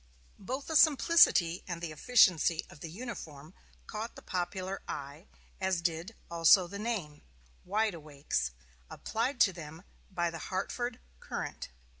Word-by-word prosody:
Both 260 +7 -4
the 320 - -4
simplicity 290 - +5
and 175 -2 -4
the 170 -2 -5
efficiency 170 -2 +4
of 175 - -14
the 165 - -7
uniform 165 - -8 0.3
caught 220 +2 -6
the - - -12
popular 185 +1 -3
eye, 145 +5 -7 0.3
as 190 -2 0
did 170 +5 -2 0.2
also 170 +2 +6
the 200 +3 -7
name, 200 -10 -3 0.4
"Wide 210 +2 +1
Awakes," 145 - -3 0.4
applied 245 +4 -2
to 190 - +6
them 160 0 -9 0.3
by 175 -3 -1
the 165 - -7
"Hartford 240 +6 -3 0.2
Courant." - - -5
180 Hz, 135 wpm, -31 LUFS, 165-220 Hz, 0.4 s, also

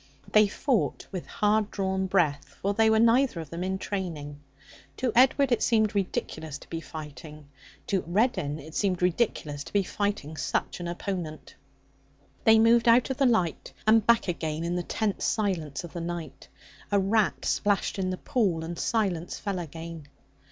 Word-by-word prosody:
They 215 -1 +6
fought 245 +3 -1
with 185 -3 -5
hard 210 0 +1
drawn 190 -1 -1
breath, 155 -7 0
for 200 +1 0
they 220 +1 +4
were 220 - +4
neither 235 -2 +4
of 160 -3 -8
them 170 +1 -4
in 190 +1 -1
training. 165 -8 -5 0.6
To 255 -2 0
Edward 265 +2 +4
it 240 - +2
seemed 220 -3 +2
ridiculous 160 -6 -3
to - - -16
be 165 -1 -4
fighting; 150 -2 -10 0.4
to 195 -2 0
Reddin 175 - +1
it 155 +1 -11
seemed 185 -2 0
ridiculous 165 -6 0
to - - -10
be 200 -1 +2
fighting 195 -6 -3
such - - -2
an 175 - -4
opponent. 175 -3 -5 0.9
They 220 0 +7
moved 230 +1 +5
out 235 +3 +5
of 260 - -3
the 275 - +4
light 185 -9 0
and 220 0 +5
back 235 0 +3
again 160 -2 -2
in 170 +1 -1
the 180 - 0
tense 205 +3 -2
silence 180 -10 -1
of 170 - -9
the 170 - -4
night. 165 -5 -6 0.4
A 205 - +4
rat 205 +2 +1
splashed 205 -1 0
in 185 -1 0
the 185 - -2
pool, 185 -10 0
and 170 +1 -6
silence 190 -7 -1
fell 200 -3 -3
again. 165 -1 -8
190 Hz, 175 wpm, -27 LUFS, 165-215 Hz, 0.9 s, They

